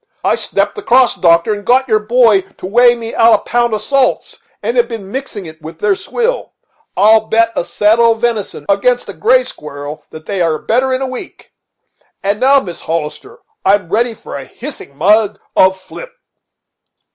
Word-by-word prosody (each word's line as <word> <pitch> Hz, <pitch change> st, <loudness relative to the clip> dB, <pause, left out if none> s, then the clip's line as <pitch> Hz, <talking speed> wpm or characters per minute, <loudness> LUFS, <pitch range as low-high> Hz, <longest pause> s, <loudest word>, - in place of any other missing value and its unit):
I -, -, +2 dB
stepped -, -, -1 dB
across, 255 Hz, -, +3 dB
doctor, 170 Hz, +4 st, +2 dB
and 205 Hz, 0 st, -6 dB
got 260 Hz, +4 st, +2 dB
your 215 Hz, -3 st, +2 dB
boy 225 Hz, -2 st, +3 dB, 0.2 s
to -, -, -9 dB
weigh 240 Hz, +5 st, +4 dB
me 230 Hz, -1 st, -7 dB
out 230 Hz, 0 st, +5 dB
a -, -, -18 dB
pound 240 Hz, -1 st, 0 dB
of 210 Hz, -, -5 dB
salts, 275 Hz, 0 st, 0 dB, 0.2 s
and 235 Hz, -, -2 dB
have 240 Hz, -1 st, +3 dB
been 220 Hz, -5 st, -8 dB
mixing 255 Hz, -7 st, -6 dB
it 160 Hz, 0 st, -12 dB
with 160 Hz, +1 st, -10 dB
their 210 Hz, +2 st, +1 dB
swill. 485 Hz, -, -3 dB, 0.4 s
I'll 220 Hz, +3 st, +4 dB
bet 230 Hz, 0 st, +2 dB
a -, -, 0 dB
saddle 225 Hz, +5 st, +3 dB
of 225 Hz, -, -12 dB
venison 230 Hz, -4 st, -2 dB
against 220 Hz, +5 st, +1 dB
a -, -, -6 dB
gray -, -, +3 dB
squirrel 150 Hz, -, -9 dB
that 155 Hz, 0 st, -12 dB
they 195 Hz, -3 st, -3 dB
are 165 Hz, -2 st, +1 dB
better 255 Hz, +9 st, 0 dB
in 260 Hz, +1 st, -1 dB
a -, -, -1 dB
week. 255 Hz, -1 st, -9 dB, 0.7 s
And 200 Hz, +2 st, -1 dB
now, 275 Hz, +2 st, +5 dB
Mrs. 175 Hz, -9 st, -8 dB
Hollister, 155 Hz, -2 st, -5 dB, 0.2 s
I'm 195 Hz, -3 st, +2 dB
ready 230 Hz, +3 st, 0 dB
for -, -, -10 dB
a 140 Hz, -1 st, -6 dB
hissing 235 Hz, -, -10 dB
mug 210 Hz, +3 st, +2 dB, 0.2 s
of 190 Hz, 0 st, +4 dB
flip." 340 Hz, -, -11 dB
220 Hz, 185 wpm, -14 LUFS, 190-245 Hz, 0.7 s, out